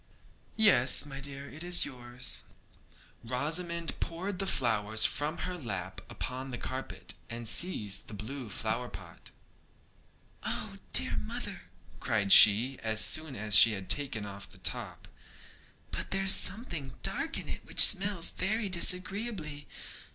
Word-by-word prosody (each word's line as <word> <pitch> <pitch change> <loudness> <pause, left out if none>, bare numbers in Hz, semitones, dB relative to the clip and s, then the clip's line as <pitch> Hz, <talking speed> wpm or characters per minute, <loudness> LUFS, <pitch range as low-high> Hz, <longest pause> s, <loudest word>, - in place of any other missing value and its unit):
'Yes, 145 - +5
my 135 -2 -8
dear! 140 0 -9
it 155 +4 -10
is 175 0 0
yours.' 125 -2 -6 0.8
Rosamond 165 +7 -3
poured 180 +3 -5
the 195 - -1
flowers 110 - +2
from 150 +3 0
her 180 0 -5
lap 95 - -6
upon 130 +1 -6
the 125 - -6
carpet, 130 +2 -6 0.2
and 115 0 -6
seized 105 - +2
the 105 - -9
blue 120 +4 -7
flower 95 - -3
pot. - - -12 1.1
'Oh, - - -5
dear - - +3
mother,' 70 -1 -6 0.3
cried 100 -3 -1
she, 115 +8 +6
as 110 -1 +2
soon 155 -4 -1
as 105 -2 +2
she 110 +4 +8
had 95 -2 -1
taken 130 -8 0
off 100 0 -9
the - - -14
top, - - -5 0.8
'but - - -5
there's 195 0 +2
something 170 - +1
dark - - -1
in - - -7
it - - -7
which - - -6
smells 195 -3 +2
very 215 +2 -2
disagreeably. 180 -4 +1
135 Hz, 135 wpm, -29 LUFS, 110-175 Hz, 1.1 s, she